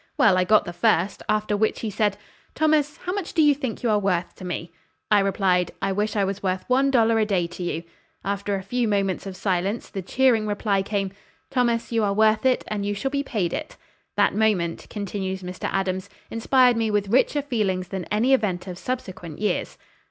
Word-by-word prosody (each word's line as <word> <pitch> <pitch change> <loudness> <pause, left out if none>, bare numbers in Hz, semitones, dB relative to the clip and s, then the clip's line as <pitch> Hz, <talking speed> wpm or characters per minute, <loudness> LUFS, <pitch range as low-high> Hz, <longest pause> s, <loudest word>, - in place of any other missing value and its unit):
Well, 200 -4 +5
I 185 0 +2
got 215 +2 +4
the 175 - -6
first, 195 -2 +1
after 215 0 +1
which 215 +1 0
he 220 - -3
said: 205 0 +1 0.4
'Thomas, 310 -1 +2
how 360 - -4
much 395 -3 -4
do 320 - +5
you 295 -1 +6
think 265 -4 -5
you 235 - +2
are 210 - +3
worth 185 -3 0
to - - -10
me?' 175 -2 -4 0.4
I 210 - +6
replied, 190 -2 +1
'I 195 - -1
wish 210 +2 -1
I 205 - +2
was 195 +1 -2
worth 185 -1 -2
one 265 +2 +3
dollar 230 -3 +3
a 215 - +3
day 185 -4 +1
to 175 +2 -8
you.' 170 -1 -2 0.4
After 200 0 -1
a 190 - -4
few 240 +4 0
moments 195 -2 0
of 190 -1 -7
silence 195 +3 -1
the 195 - -4
cheering 230 +2 +2
reply 205 -1 0
came, 195 -1 -2 0.4
'Thomas, 240 -3 +1
you 225 -2 +1
are 200 -1 +1
worth 220 +3 +4
it, 255 - +2
and 210 -1 -2
you 205 0 -1
shall 265 +7 -2
be 280 0 0
paid 205 -11 -2
it.' 310 0 -5 0.4
That - - +4
moment," 205 -6 0
continues 190 -2 -4
Mr. 180 0 -4
Adams, 190 0 -1 0.2
"inspired 250 +1 +4
me 225 -1 +1
with 205 -1 0
richer 265 +5 +2
feelings 195 -9 -1
than 190 -3 -4
any 225 +8 +2
event 200 -8 +1
of 180 -1 -7
subsequent 185 -10 -5
years." 210 0 -1
205 Hz, 210 wpm, -24 LUFS, 190-230 Hz, 0.4 s, you